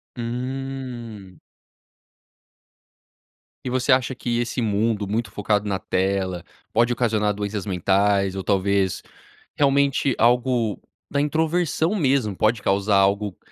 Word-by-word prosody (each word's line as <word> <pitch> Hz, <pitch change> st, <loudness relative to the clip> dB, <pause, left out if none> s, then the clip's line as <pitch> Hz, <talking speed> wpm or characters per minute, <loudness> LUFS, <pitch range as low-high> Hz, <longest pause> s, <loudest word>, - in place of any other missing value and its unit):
Hum. 120 Hz, -5 st, -6 dB, 2.3 s
E -, -, -1 dB
você 130 Hz, 0 st, +1 dB
acha 130 Hz, -1 st, +1 dB
que 120 Hz, -1 st, -2 dB
esse 120 Hz, +1 st, -2 dB
mundo 105 Hz, -1 st, 0 dB
muito 110 Hz, +3 st, -2 dB
focado 105 Hz, 0 st, 0 dB
na 95 Hz, -2 st, -1 dB
tela 95 Hz, -2 st, -1 dB, 0.3 s
pode 115 Hz, +2 st, +3 dB
ocasionar 110 Hz, -4 st, +1 dB
doenças 105 Hz, 0 st, -4 dB
mentais 100 Hz, +1 st, +1 dB
ou, 95 Hz, -, -4 dB
talvez, 100 Hz, -1 st, +1 dB, 0.5 s
realmente 140 Hz, -1 st, +2 dB
algo 120 Hz, -2 st, +2 dB, 0.3 s
da 140 Hz, -, 0 dB
introversão 160 Hz, +4 st, 0 dB
mesmo, 130 Hz, -, +1 dB
pode 110 Hz, +2 st, +1 dB
causar 100 Hz, +1 st, +1 dB
algo 100 Hz, 0 st, +1 dB
110 Hz, 110 wpm, -23 LUFS, 100-130 Hz, 2.3 s, pode